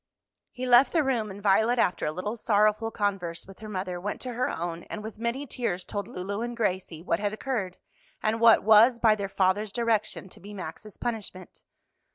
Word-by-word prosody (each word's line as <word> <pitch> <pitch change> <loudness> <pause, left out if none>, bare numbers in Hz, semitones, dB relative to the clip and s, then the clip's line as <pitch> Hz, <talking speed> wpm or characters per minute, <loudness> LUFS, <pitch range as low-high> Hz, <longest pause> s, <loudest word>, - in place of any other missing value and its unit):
He 255 0 -6
left 250 +2 +6
the 325 -3 +3
room, 240 -6 0
and 200 +1 -9
Violet, 220 +4 +3
after 180 -9 +1
a - - 0
little 185 +7 -4
sorrowful 215 0 +2
converse 195 -6 -2
with 195 0 -14
her 215 0 -8
mother, 185 -3 -4
went 205 +2 -4
to 250 -1 -5
her 250 +2 0
own, 170 0 -4
and 210 - -7
with 220 0 -8
many 235 +5 -2
tears 225 -9 -3
told 205 -2 -4
Lulu 200 +4 -4
and 240 0 -4
Gracie 185 -6 -2
what 170 -1 0
had 205 0 -1
occurred, 215 -6 -3 0.5
and 220 +1 +1
what 230 -1 +7
was, 220 +3 +6
by 225 -2 +5
their 200 -2 -3
father's 195 +2 +1
direction, 220 -4 -1
to - - -14
be 205 +2 -10
Max's 190 +3 -8
punishment. 210 -6 -6
210 Hz, 200 wpm, -27 LUFS, 190-230 Hz, 0.5 s, what